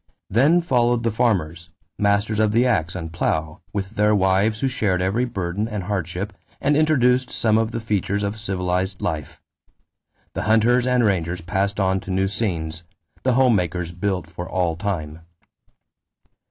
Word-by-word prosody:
Then 145 Hz, -, +4 dB
followed 120 Hz, -7 st, +2 dB
the 115 Hz, -, +1 dB
farmers, 85 Hz, -7 st, 0 dB, 0.3 s
masters 100 Hz, +1 st, +1 dB
of 110 Hz, -1 st, +2 dB
the 120 Hz, +3 st, +4 dB
ax 90 Hz, -10 st, +1 dB
and 80 Hz, -3 st, -6 dB
plow, 80 Hz, -2 st, -1 dB
with 95 Hz, 0 st, -3 dB
their 105 Hz, -1 st, +2 dB
wives 100 Hz, +3 st, +2 dB
who 135 Hz, -, +2 dB
shared 105 Hz, -8 st, 0 dB
every 100 Hz, +7 st, +1 dB
burden 100 Hz, -2 st, -3 dB
and 105 Hz, -4 st, -4 dB
hardship 95 Hz, +1 st, -3 dB, 0.3 s
and 145 Hz, +1 st, +2 dB
introduced 130 Hz, -5 st, +3 dB
some 110 Hz, -2 st, +1 dB
of 110 Hz, 0 st, 0 dB
the 115 Hz, -, -4 dB
features 105 Hz, -2 st, -1 dB
of 100 Hz, +2 st, -3 dB
civilized 95 Hz, -2 st, -2 dB
life. 75 Hz, -4 st, -4 dB, 0.9 s
The -, -, -3 dB
hunters 120 Hz, +3 st, +4 dB
and 125 Hz, -1 st, +3 dB
rangers 90 Hz, -4 st, 0 dB
passed 100 Hz, +3 st, -1 dB
on 95 Hz, -1 st, +2 dB
to 95 Hz, -, -11 dB
new 95 Hz, +1 st, +1 dB
scenes; 85 Hz, -6 st, -3 dB, 0.4 s
the 130 Hz, -, +2 dB
home 125 Hz, -2 st, +4 dB
makers 90 Hz, -2 st, -1 dB
built 90 Hz, -1 st, -2 dB
for 85 Hz, +2 st, -8 dB
all 90 Hz, -3 st, 0 dB
time. 80 Hz, -4 st, -4 dB
100 Hz, 160 wpm, -22 LUFS, 90-115 Hz, 0.9 s, Then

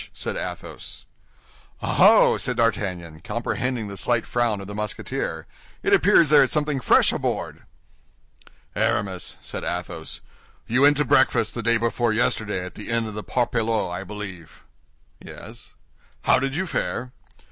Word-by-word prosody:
said -, -, -4 dB
Athos. -, -, -6 dB, 0.7 s
"Oh, -, -, -2 dB
oh!" -, -, +7 dB
said -, -, -2 dB
D'Artagnan, 90 Hz, -8 st, -1 dB
comprehending 120 Hz, +4 st, -3 dB
the 100 Hz, -, -7 dB
slight 115 Hz, +5 st, 0 dB
frown 120 Hz, -4 st, 0 dB
of 100 Hz, -, -7 dB
the 105 Hz, -, -8 dB
Musketeer. 105 Hz, 0 st, -4 dB, 0.4 s
"It -, -, +2 dB
appears 160 Hz, -, +5 dB
there 150 Hz, -, +8 dB
is 135 Hz, -, +3 dB
something 150 Hz, -2 st, +1 dB
fresh -, -, +4 dB
aboard." -, -, -3 dB, 1.1 s
"Aramis," 100 Hz, -6 st, -1 dB
said -, -, -5 dB
Athos, 85 Hz, -2 st, -5 dB, 0.4 s
"you 125 Hz, +4 st, +1 dB
went 145 Hz, 0 st, +6 dB
to 150 Hz, -, +1 dB
breakfast 110 Hz, -2 st, +3 dB
the 120 Hz, -, -4 dB
day 115 Hz, +1 st, +2 dB
before 115 Hz, 0 st, 0 dB
yesterday 105 Hz, -4 st, 0 dB
at 90 Hz, -, -9 dB
the -, -, -9 dB
inn 115 Hz, 0 st, 0 dB
of 110 Hz, -, -6 dB
the 105 Hz, 0 st, -6 dB
Parpaillot, 115 Hz, -5 st, 0 dB
I 90 Hz, +2 st, -4 dB
believe?" 95 Hz, -5 st, -9 dB, 0.6 s
"Yes." -, -, -11 dB, 0.5 s
"How 130 Hz, -, +4 dB
did 135 Hz, +1 st, -2 dB
you 185 Hz, +4 st, -1 dB
fare?" 125 Hz, -7 st, -3 dB
115 Hz, 150 wpm, -24 LUFS, 100-125 Hz, 1.1 s, there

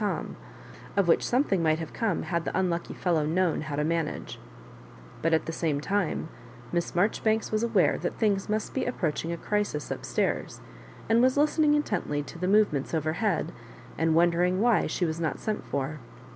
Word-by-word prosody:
Tom, 205 Hz, -, -2 dB, 0.6 s
of 200 Hz, -3 st, +3 dB
which 165 Hz, -, +4 dB
something 240 Hz, -8 st, +1 dB
might 155 Hz, -1 st, +3 dB
have 160 Hz, -1 st, -6 dB
come 220 Hz, -7 st, -1 dB
had 170 Hz, +1 st, -1 dB
the -, -, -2 dB
unlucky 175 Hz, -2 st, -1 dB
fellow 170 Hz, -4 st, +1 dB
known 165 Hz, +2 st, +1 dB
how 155 Hz, -2 st, -4 dB
to 150 Hz, -, 0 dB
managa 165 Hz, 0 st, -2 dB, 0.8 s
But, 165 Hz, -, +1 dB
at 160 Hz, -, +2 dB
the 165 Hz, -, -3 dB
same 160 Hz, -3 st, -1 dB
time; 195 Hz, -1 st, -1 dB, 0.4 s
Miss 170 Hz, -1 st, -1 dB
Marjoribanks 220 Hz, +4 st, +1 dB
was 215 Hz, 0 st, +1 dB
aware 225 Hz, -5 st, +2 dB
that -, -, -3 dB
things 205 Hz, -3 st, +1 dB
must 215 Hz, 0 st, -1 dB
be 265 Hz, -, -1 dB
approaching 170 Hz, -8 st, -2 dB
a 170 Hz, -, -3 dB
crisis 205 Hz, -7 st, -2 dB
up -, -, -4 dB
stairs, -, -, -1 dB, 0.5 s
and 225 Hz, +2 st, +4 dB
was 255 Hz, +2 st, +3 dB
listening 300 Hz, 0 st, +4 dB
intently 150 Hz, -, -1 dB
to 170 Hz, -, -10 dB
the 180 Hz, -, -1 dB
move 210 Hz, -2 st, +4 dB
ments 140 Hz, +3 st, -2 dB
overhead, 160 Hz, +4 st, 0 dB, 0.4 s
and 160 Hz, -1 st, +1 dB
wondering 175 Hz, +2 st, +3 dB
why 235 Hz, 0 st, +3 dB
she 180 Hz, -, -1 dB
was 160 Hz, 0 st, -2 dB
not 160 Hz, -2 st, -1 dB
sent 215 Hz, -1 st, -3 dB
for. 140 Hz, +2 st, -3 dB
175 Hz, 185 wpm, -27 LUFS, 160-215 Hz, 0.8 s, which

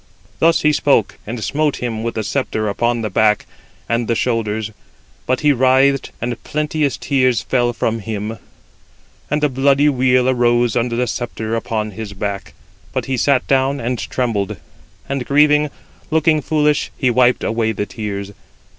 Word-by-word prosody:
Thus 165 Hz, 0 st, +3 dB
he 150 Hz, 0 st, +4 dB
spoke, 135 Hz, -8 st, +2 dB
and 115 Hz, 0 st, -4 dB
smote 150 Hz, 0 st, 0 dB
him 115 Hz, -3 st, -3 dB
with 115 Hz, +1 st, -3 dB
the 110 Hz, -, -1 dB
sceptre 110 Hz, -2 st, -1 dB
upon 120 Hz, +3 st, 0 dB
the 110 Hz, -, -1 dB
back 105 Hz, +1 st, +2 dB, 0.4 s
and 115 Hz, 0 st, 0 dB
the 115 Hz, -, +1 dB
shoulders; 110 Hz, -3 st, -1 dB, 0.6 s
but 130 Hz, 0 st, +1 dB
he 150 Hz, -, +4 dB
writhed, 130 Hz, +2 st, +3 dB
and 120 Hz, -1 st, -4 dB
plenteous 150 Hz, -1 st, -1 dB
tears 130 Hz, -4 st, +1 dB
fell 120 Hz, -2 st, +1 dB
from 115 Hz, -1 st, -1 dB
him, 110 Hz, +1 st, -5 dB, 0.9 s
and 150 Hz, +1 st, 0 dB
a -, -, +5 dB
bloody 140 Hz, +2 st, +3 dB
weal 130 Hz, -2 st, +2 dB
arose 120 Hz, -2 st, +2 dB
under 120 Hz, 0 st, 0 dB
the 125 Hz, +1 st, +1 dB
sceptre 115 Hz, -1 st, -3 dB
upon 110 Hz, -2 st, -2 dB
his 105 Hz, 0 st, -7 dB
back. 100 Hz, 0 st, -5 dB, 0.4 s
But -, -, -2 dB
he 135 Hz, -, -1 dB
sat 130 Hz, +1 st, +2 dB
down 135 Hz, +1 st, +1 dB
and 120 Hz, 0 st, -2 dB
trembled; 100 Hz, 0 st, -2 dB, 0.5 s
and 140 Hz, -2 st, -2 dB
grieving, 150 Hz, +2 st, +3 dB, 0.4 s
looking 160 Hz, -1 st, +2 dB
foolish, 150 Hz, 0 st, +1 dB
he 130 Hz, -3 st, +2 dB
wiped 125 Hz, +1 st, +3 dB
away 110 Hz, 0 st, 0 dB
the 105 Hz, -1 st, -3 dB
tears. 100 Hz, -2 st, -5 dB
120 Hz, 160 wpm, -18 LUFS, 110-140 Hz, 0.9 s, a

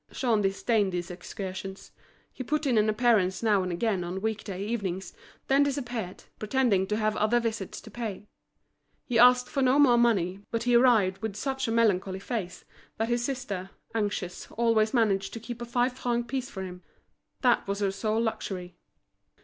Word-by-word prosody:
Jean 230 Hz, -5 st, +1 dB
disdained 200 Hz, +1 st, +1 dB
these 175 Hz, 0 st, -4 dB
excursions; 190 Hz, +1 st, -7 dB, 0.4 s
he 260 Hz, -, -6 dB
put 300 Hz, +4 st, -1 dB
in 260 Hz, -4 st, +2 dB
an 215 Hz, 0 st, +3 dB
appearance 215 Hz, -4 st, +2 dB
now 210 Hz, -3 st, +3 dB
and 185 Hz, -1 st, -2 dB
again 190 Hz, +1 st, 0 dB
on 180 Hz, +2 st, -4 dB
week 220 Hz, +1 st, -2 dB
day 195 Hz, -1 st, -5 dB
evenings, 190 Hz, -5 st, -3 dB, 0.3 s
then 275 Hz, +1 st, +3 dB
disappeared, 245 Hz, -9 st, -2 dB, 0.2 s
pretending 215 Hz, -4 st, +1 dB
to 210 Hz, -, -1 dB
have 215 Hz, -1 st, 0 dB
other 215 Hz, +3 st, +3 dB
visits 225 Hz, -4 st, -3 dB
to 220 Hz, -, -13 dB
pay; 215 Hz, -3 st, -5 dB, 0.8 s
he 235 Hz, -3 st, +1 dB
asked 250 Hz, +1 st, +6 dB
for 275 Hz, +2 st, -2 dB
no 260 Hz, +1 st, +4 dB
more 255 Hz, -5 st, +6 dB
money, 195 Hz, -6 st, +2 dB
but 230 Hz, 0 st, -2 dB
he 245 Hz, 0 st, +2 dB
arrived 220 Hz, -7 st, +4 dB
with 220 Hz, -2 st, -4 dB
such 265 Hz, +2 st, -2 dB
a -, -, -1 dB
melancholy 200 Hz, -5 st, +2 dB
face, 195 Hz, -3 st, -5 dB, 0.3 s
that 225 Hz, +1 st, -1 dB
his 240 Hz, 0 st, +1 dB
sister, 240 Hz, -8 st, -4 dB, 0.2 s
anxious, 205 Hz, -5 st, -3 dB
always 225 Hz, -2 st, +2 dB
managed 195 Hz, -5 st, +1 dB
to 230 Hz, -, -5 dB
keep 240 Hz, +1 st, -8 dB
a -, -, -3 dB
five 245 Hz, +1 st, +1 dB
franc 240 Hz, -2 st, -2 dB
piece 260 Hz, +1 st, -3 dB
for 190 Hz, -6 st, -6 dB
him. 180 Hz, -1 st, -8 dB, 0.6 s
That 245 Hz, -5 st, +3 dB
was 200 Hz, 0 st, -1 dB
her 200 Hz, -1 st, 0 dB
sole 215 Hz, +3 st, -1 dB
luxury. 180 Hz, -5 st, -4 dB
220 Hz, 180 wpm, -28 LUFS, 195-240 Hz, 0.8 s, asked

